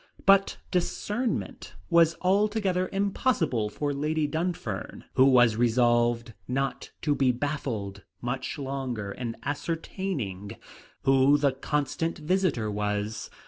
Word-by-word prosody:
But 195 0 +5
discernment 210 +6 -2 0.2
was 170 -1 +5
altogether 195 -1 +1
impossible 195 - 0
for 145 +6 -2
Lady 150 +2 0
Dunfern, 160 - -3
who 130 - +5
was 120 -4 +5
resolved 120 0 +2
not 135 +2 -2
to 150 - +2
be 135 -3 +3
baffled 120 -7 -3 0.2
much 125 +2 -3
longer 130 -7 -4
in 115 +1 -5
ascertaining 145 - -3 0.5
who 135 +2 +5
the 140 -1 +2
constant 150 +4 -2
visitor 155 - 0
was. 105 +1 -2
135 Hz, 105 wpm, -27 LUFS, 120-170 Hz, 0.5 s, But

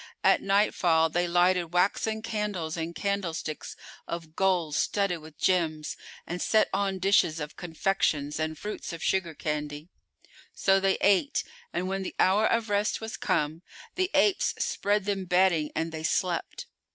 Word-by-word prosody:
At - - +4
nightfall 180 -5 +3
they 175 +2 0
lighted 175 -1 +2
waxen 220 +4 +1
candles 205 -8 -3
in 165 0 -4
candlesticks 180 -6 -3 0.3
of 165 -2 -6
gold 180 -5 +1
studded 195 +2 0
with 155 -1 -14
gems 160 -5 0 0.3
and 175 0 -5
set 220 -1 +3
on 195 -1 0
dishes 185 -4 +3
of 150 0 -6
confections 160 -4 -1
and 155 0 -2
fruits 210 -2 -6
of 165 - -7
sugar 175 -4 0
candy. 150 +1 -4 0.7
So 195 0 +3
they 195 0 +2
ate; 200 +8 +3 0.3
and 185 - -2
when 195 +1 -2
the 190 - -5
hour 205 +4 +4
of 230 -1 +1
rest 205 0 0
was 220 -1 -6
come, 160 -4 -1 0.3
the 370 0 0
apes 400 - +3
spread 205 0 0
them 195 -2 -1
bedding 180 -4 +3
and 165 +1 -1
they 160 -1 -5
slept. 175 +2 -1
180 Hz, 150 wpm, -28 LUFS, 160-200 Hz, 0.7 s, At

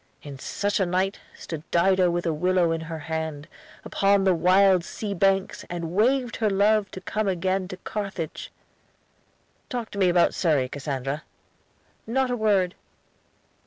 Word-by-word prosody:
'" - - -41
'"In 140 -2 -9
such 205 +9 -1
a 190 - +2
night, 185 +3 0 0.2
Stood 160 -3 -7
Dido 185 +1 +3
with 175 +1 -1
a 165 - +1
willow 180 +1 +2
in 165 0 -1
her 160 0 -6
hand, 160 -1 -4 0.4
Upon 200 0 +2
the 190 -1 +4
wild 185 +1 +4
sea 205 +3 -5
banks, 195 +1 +1
and 170 -2 -4
waved 245 +6 +1
her 220 -2 +1
love 205 +1 +3
To 190 - -9
come 215 +2 -2
again 185 0 0
to 185 - -7
Carthage.'" 195 -5 -5 1.2
"Talk 245 -5 -4
to 200 - -6
me 185 -2 +4
about 175 -1 +3
Surrey, 150 -7 +1
Cassandra." 140 +1 -4 0.9
"Not 260 +2 +1
a - - +1
word." 200 -5 +2
185 Hz, 160 wpm, -25 LUFS, 165-200 Hz, 1.2 s, the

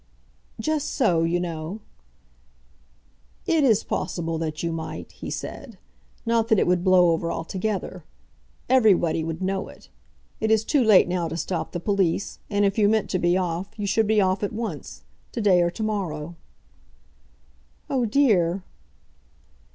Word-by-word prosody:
"Just 310 -2 -1
so, 175 - +2
you 165 +2 +1
know." 170 +3 -4 1.7
"It 330 -5 +2
is 225 -7 +4
possible 165 -2 -3
that 155 -1 -4
you 170 - -1
might," 165 0 -6
he - - -8
said. 235 -8 -7 0.5
"Not 230 -1 +2
that 220 -2 +3
it - - +3
would 180 0 +1
blow 185 -2 +5
over 165 +1 -1
altogether. 185 +1 -3 0.6
Everybody 195 -10 +3
would 165 +2 -4
know 190 +1 -1
it. - - -15 0.5
It 220 - 0
is 220 0 +3
too 280 +1 +2
late 215 -6 +6
now 175 -1 -1
to 165 - -5
stop 170 +1 -3
the 175 - -4
police, 195 -1 0
and 205 -1 +2
if 195 +2 0
you 205 -1 +5
meant 220 -1 +1
to 185 - 0
be 175 +1 +2
off, 180 +2 -3
you 205 - -3
should 215 +2 +2
be 215 0 +3
off 190 -1 +1
at 205 - -2
once; 225 +1 -6 0.3
to - - -3
day 195 -5 +4
or 175 - +2
to 200 +5 -5
morrow." 175 -7 -3 1.5
"Oh 260 -3 0
dear!" 200 -8 +2
190 Hz, 160 wpm, -24 LUFS, 170-220 Hz, 1.7 s, late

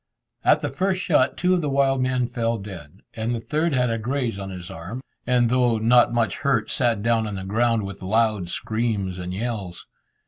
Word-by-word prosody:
At - - +4
the - - -2
first 190 0 0
shot 150 -8 +2
two 180 +1 +2
of 180 - +2
the 150 - -1
wild 135 -1 +2
men 130 -1 +1
fell 115 -2 -1
dead, 95 -4 -10
and 115 +2 -2
the - - -3
third 155 +8 0
had 125 -2 +2
a 115 - -1
graze 120 -3 -2
on 95 0 -5
his 90 -2 -7
arm, 95 +11 -7 0.2
and 125 -1 +3
though 125 -2 +3
not 120 +3 +4
much 115 -4 0
hurt, 135 -6 0
sat 120 -6 +1
down 115 -1 +2
on 105 - -4
the 95 - -5
ground 115 +3 +1
with 100 0 -8
loud 105 -2 +1
screams 105 -5 -2
and 90 0 -5
yells. 100 -3 -4
115 Hz, 205 wpm, -24 LUFS, 100-125 Hz, 0.2 s, At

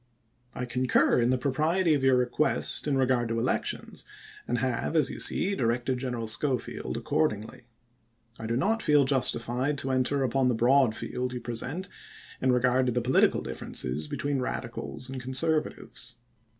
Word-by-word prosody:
I 125 - -3
concui* 125 0 +2
in 120 - +2
the 130 - +2
propriety 155 +7 +1
of 140 -3 0
your 135 -1 +5
request 125 +5 +1
in 140 -2 +1
regard 125 -3 +1
to 115 - -1
elections, 115 +2 -2 0.4
and - - 0
have, - - -1
as - - +3
you - - -7
see, 200 - +2
directed 125 -3 0
General 125 -3 -3
Scho 130 +5 +1
field - - -6
accordingly. 105 +8 -2 0.7
I 110 - -5
do 115 +1 0
not 220 - +1
feel 150 -5 +4
justified 130 +1 0
to 135 -1 -2
enter 130 +2 +1
upon 130 +1 +1
the 125 - +2
broad 125 0 +3
field 125 +2 -4
you 125 - -4
present 125 - -4 0.5
in 130 - +3
regard 125 +1 +2
to - - +2
the 125 - 0
political 125 +2 +3
dif - - -6
ferences 75 +4 -2
between 140 -1 -2
Radicals 125 0 -4
and 130 -1 -6
Conservatives. 135 -2 -1
130 Hz, 165 wpm, -28 LUFS, 120-135 Hz, 0.7 s, your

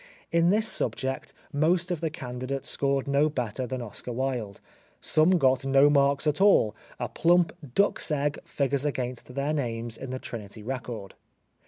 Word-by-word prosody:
In 170 0 +4
this 215 +3 +3
subject 130 -9 -2 0.2
most 170 +5 +2
of 170 -3 -2
the 165 - 0
candidates 130 -2 -5
scored 140 0 0
no 140 +2 +3
better 125 -2 -3
than 130 0 -4
Oscar 115 +2 -7
Wilde, 120 -5 -3 0.4
some 165 +4 +4
got 135 -3 +3
no 135 +2 +5
marks 140 0 +3
at 150 +4 +1
all, 115 - +5 0.2
a - - -1
plump 175 +1 +3 0.2
duck's 200 -3 +2
egg 145 -1 0
figures 140 -1 -1
against 125 -3 -3
their 140 +2 0
names 115 -5 -3
in 135 - -7
the 130 - -3
Trinity 110 -4 -8
record. 120 -5 -5
135 Hz, 160 wpm, -27 LUFS, 125-155 Hz, 0.4 s, no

